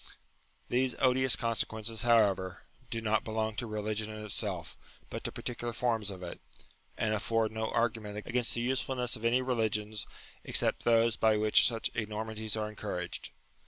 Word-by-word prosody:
These 125 0 +1
odious 130 0 +4
con 115 -1 -1
sequences, 110 0 -1
however, 100 -6 +3 0.3
do 115 - -2
not 110 -1 +1
belong 110 -1 -2
to 120 - -3
religion 110 0 -2
in 110 0 -7
itself, 95 -6 -3 0.4
but - - -5
to - - 0
particular 120 -1 -4
forms 115 -3 0
of 95 -2 -7
it, 85 - -7 0.6
and 110 -1 +1
afford 110 +1 +1
no 110 0 -2
argument 110 -3 -1
against 125 -1 0
the 120 - -1
usefulness 130 0 0
of 110 0 -7
any 125 +2 +3
religions 110 -4 -1 0.4
except - - +3
those 115 -1 +4
by 110 -1 +4
which 105 0 +6
such 115 -2 0
enormities 110 0 -3
are 110 0 -3
encou 105 -2 -4
raged. 90 0 -5
110 Hz, 160 wpm, -31 LUFS, 105-120 Hz, 0.6 s, which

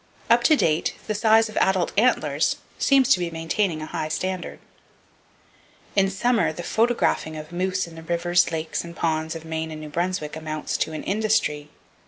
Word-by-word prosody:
Up 235 +1 +6
to 310 - +6
date 160 - +1
the 215 - -1
size 220 +1 +4
of 215 - -10
adult 190 -2 +2
antlers 240 +5 +2 0.2
seem 275 -1 +5
to 265 -6 +4
be 175 -1 -1
maintaining 165 0 -1
a - - -4
high 155 - -3
standard. 185 +3 -3 1.4
In 195 -1 +4
summer, 225 +3 +1
the 175 +2 -7
photographing 220 -8 +1
of 155 +2 -9
moose 185 +2 -1
in 170 - -12
the 165 - -10
rivers, 175 +1 +1
lakes 160 0 -3
and 170 0 -10
ponds 160 -1 -1
of 165 0 -8
Maine 160 0 -3
and 155 -1 -7
New 155 0 -8
Brunswick 170 -1 -2
amounts 155 -1 -4
to 160 - -2
an 155 - -5
industry. 200 -8 0
175 Hz, 180 wpm, -24 LUFS, 160-205 Hz, 1.4 s, Up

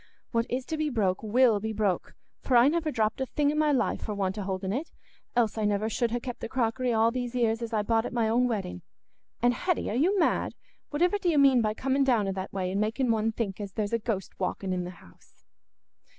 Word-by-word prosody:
What 230 0 0
is 250 +1 -2
to 315 - -3
be 305 -1 0
broke 200 -8 0
will 220 0 +3
be 220 +2 -3
broke, 205 -4 -1 0.3
for 255 - +3
I 240 +2 +7
never 325 0 0
dropped 225 -2 0
a 265 - -1
thing 290 +2 +1
i' - - -2
my 305 0 +2
life 270 - 0
for 210 - -4
want 190 -1 -1
o' - - -2
holding 190 0 -3
it, 290 +8 -3 0.5
else 225 -2 +1
I - - -1
should 210 - +2
never 210 +2 0
ha' 235 +1 0
kept 245 -2 -5
the - - -5
crockery 250 0 0
all 225 0 +3
these 245 0 -4
'ears 230 -2 +1
as 230 - -4
I 215 -2 +1
bought 225 +2 +1
at - - -7
my 235 -2 +1
own 240 +3 +3
wedding. 195 - -3 0.6
And 245 0 +5
Hetty, 355 - -1
are - - -2
you 355 +11 +2
mad? 335 - +1 0.4
Whativer 355 +7 +2
do 360 - +2
you 315 - +2
mean 270 -3 +6
by 215 -1 0
coming 270 +3 +1
down 235 -7 +2
i' - - 0
that 190 0 -5
way, 185 -1 -2
and 200 +2 0
making 230 +3 +1
one 225 0 +1
think 210 -3 -3
as 200 -2 -6
there's 210 +1 -2
a 230 - +2
ghost 210 -4 -3
a - - -17
walking 185 +1 -2
i' - - -1
th' 180 - -11
house?" 85 - -21
230 Hz, 250 wpm, -28 LUFS, 210-260 Hz, 0.6 s, I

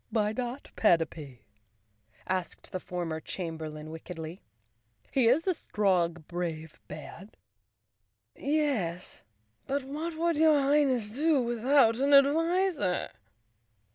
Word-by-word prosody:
"Why 210 -2 +1
not 250 +3 -5
Panapee?" 160 - +1 0.8
asked 185 -2 -4
the 185 - -3
former 175 -3 -4
chamberlain 155 -3 -6
wickedly. 160 +1 -8 0.7
"He 255 -4 +3
is 275 +8 +3
a 375 - +2
strong, 175 - 0
brave 165 -3 -5
man." 155 +6 -9 1.0
Chapter - - -21
One - - +1
"Yes, 225 - -1 0.5
but 280 0 -1
what 310 +5 -5
would 335 -1 +1
your 310 -1 +5
Highness 270 -6 +2
do 300 +4 +2
without 240 0 +3
an 280 +1 +2
adviser?" 325 - +2
225 Hz, 110 wpm, -29 LUFS, 170-285 Hz, 1.0 s, your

